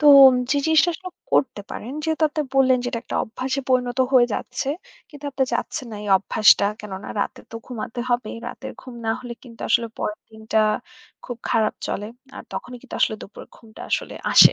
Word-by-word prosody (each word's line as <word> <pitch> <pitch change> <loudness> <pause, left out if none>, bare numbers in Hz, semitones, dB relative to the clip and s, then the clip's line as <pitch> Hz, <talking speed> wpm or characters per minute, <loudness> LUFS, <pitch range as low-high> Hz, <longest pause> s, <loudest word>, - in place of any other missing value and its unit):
তো 300 - +3 0.4
যে 290 - +3
জিনিসটা 320 +2 +5
আসলে 370 +2 -7 0.2
করতে 240 -6 +2
পারেন, 245 +5 -6
যেহেতু 320 0 0
আপনি 305 +1 -1
বললেন 260 -1 +6
যে 245 - -3
এটা 230 - -2
একটা - - -3
অভ্যাসে 260 +4 -3
পরিণত 250 0 +2
হয়ে 245 -2 +7
যাচ্ছে। 270 - -3 0.4
কিন্তু 290 -2 -13
আপনি 270 0 0
চাচ্ছেন 245 +1 -2
না 210 - -6
এই 205 - -5
অভ্যাসটা 200 +1 +5
কেননা 195 -1 -7
রাতে - - -3
তো - - -11
ঘুমাতে 240 -1 -5
হবেই, 240 -2 0
রাতের - - -8
ঘুম 255 - -10
না - - +2
হলে 245 -1 -6
কিন্তু 235 -3 -14
আসলে 235 -1 +3
পরের 210 - -3
দিনটা 220 0 -1 0.7
খুব 245 -2 -5
খারাপ 220 -1 +2
চলে। 205 - -3 0.3
আর - - -7
তখনই 250 0 -5
কিন্তু 265 - -9
আসলে 220 - +3
দুপুরের 200 - -11
ঘুমটা 220 -2 -15
আসলে - - -1 0.2
আসে - - +10
245 Hz, 190 wpm, -23 LUFS, 220-265 Hz, 0.7 s, আসে